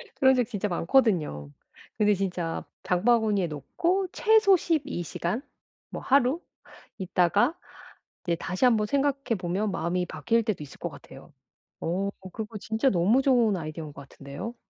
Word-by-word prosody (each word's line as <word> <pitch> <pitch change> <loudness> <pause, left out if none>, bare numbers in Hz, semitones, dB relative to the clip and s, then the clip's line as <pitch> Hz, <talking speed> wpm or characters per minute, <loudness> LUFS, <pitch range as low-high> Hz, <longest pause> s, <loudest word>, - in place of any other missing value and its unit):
그런 265 0 +5
적 250 - +3
진짜 210 -2 -3
많거든요. 170 - +1 0.5
근데 210 -1 +4
진짜 180 -4 -2 0.2
장바구니에 210 0 +2
놓고 350 - -1
최소 435 -2 +5
12 315 - -1
시간 175 +8 -3 0.5
뭐 - - -6
하루 275 +4 +2 0.6
있다가 190 - +2 0.7
이제 170 - +1
다시 185 +7 -1
1 240 -3 +5
번 210 -1 0
생각해 275 -2 0
보면 190 +4 -1
마음이 180 +1 -1
바뀔 225 +11 0
때도 210 -8 -2
있을 140 - -12
것 - - -3
같아요. - - -14 0.5
어. 190 +4 -1 0.2
그거 220 -1 -6
진짜 220 +5 0
너무 205 +6 +3
좋은 240 -7 +3
아이디어인 155 -1 -6
것 140 0 -11
같은데요. 140 - -8
210 Hz, 295 characters per minute, -27 LUFS, 175-250 Hz, 0.7 s, 그런